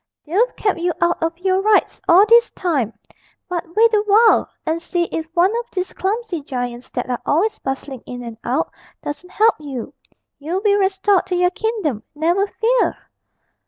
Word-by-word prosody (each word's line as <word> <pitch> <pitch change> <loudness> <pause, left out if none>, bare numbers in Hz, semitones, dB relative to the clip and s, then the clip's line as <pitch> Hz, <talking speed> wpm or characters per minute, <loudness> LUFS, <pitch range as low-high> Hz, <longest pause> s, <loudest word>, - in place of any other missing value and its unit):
'They've 410 +11 +1
kept 405 -5 0
you 350 +1 +1
out 345 0 +1
of 330 +1 -1
your 375 +1 +1
rights 425 +1 +2
all 365 +4 +7
this 470 +2 +5
time; 290 - -1 0.6
but 355 -2 -2
wait 455 +1 +5
a 420 - +4
while, 440 +3 +5 0.2
and 325 +1 -1
see 345 0 -1
if 320 -1 -3
one 355 +3 +4
of 475 0 -3
these 370 -1 -3
clumsy 400 -3 -2
giants 245 -2 -5
that - - -4
are 245 -1 -3
always 370 +9 +1
bustling 270 -1 -5
in 245 0 -7
and 230 -2 -8
out 265 +7 -1 0.3
doesn't 295 +5 -6
help 440 +4 +4
you; 275 -6 -6 0.5
you'll 330 +6 -2
be 415 -1 +3
restored 385 -1 +2
to 365 - -1
your 360 0 +2
kingdom, 395 - -2
never 345 +6 +1
fear!' 475 +4 +1
360 Hz, 175 wpm, -20 LUFS, 295-415 Hz, 0.6 s, all